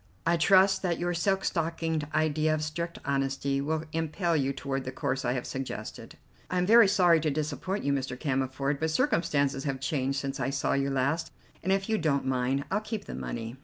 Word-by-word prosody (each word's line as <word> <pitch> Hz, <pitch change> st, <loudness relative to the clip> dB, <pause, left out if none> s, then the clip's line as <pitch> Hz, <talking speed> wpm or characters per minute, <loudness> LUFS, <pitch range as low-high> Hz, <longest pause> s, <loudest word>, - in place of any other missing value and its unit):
I 170 Hz, +1 st, +3 dB
trust 190 Hz, +3 st, +5 dB
that 175 Hz, -3 st, 0 dB
your 175 Hz, 0 st, -1 dB
silk 190 Hz, +3 st, +1 dB
stockinged 165 Hz, -2 st, -1 dB
idea 155 Hz, 0 st, +1 dB
of 155 Hz, -, -3 dB
strict 170 Hz, +2 st, -4 dB
honesty 135 Hz, 0 st, 0 dB
will 155 Hz, +2 st, -1 dB
impel 165 Hz, +2 st, 0 dB
you 135 Hz, -3 st, +1 dB
toward 135 Hz, 0 st, -3 dB
the 130 Hz, -, -5 dB
course 130 Hz, +1 st, -2 dB
I 120 Hz, 0 st, +1 dB
have 125 Hz, -1 st, -3 dB
suggested." 135 Hz, -1 st, -6 dB, 0.3 s
"I 180 Hz, -, -1 dB
am 180 Hz, -, +2 dB
very 225 Hz, +1 st, +7 dB
sorry 175 Hz, -4 st, +4 dB
to 155 Hz, 0 st, 0 dB
disappoint 155 Hz, +7 st, -2 dB
you, 140 Hz, -, +1 dB
Mr. 130 Hz, -2 st, -3 dB
Cammerford, 135 Hz, 0 st, -1 dB
but 160 Hz, +1 st, 0 dB
circumstances 140 Hz, -4 st, +1 dB
have 135 Hz, -2 st, -2 dB
changed 135 Hz, -1 st, -1 dB
since 140 Hz, -1 st, -4 dB
I 135 Hz, 0 st, 0 dB
saw 140 Hz, 0 st, 0 dB
you 140 Hz, 0 st, +1 dB
last, 140 Hz, +5 st, 0 dB, 0.3 s
and, 190 Hz, -, -1 dB
if 195 Hz, 0 st, +1 dB
you 220 Hz, -1 st, +1 dB
don't 145 Hz, -4 st, +1 dB
mind, 130 Hz, +2 st, 0 dB
I'll 205 Hz, +2 st, +1 dB
keep 215 Hz, -1 st, -5 dB
the -, -, -7 dB
money." 115 Hz, +2 st, -5 dB
150 Hz, 200 wpm, -28 LUFS, 135-170 Hz, 0.3 s, very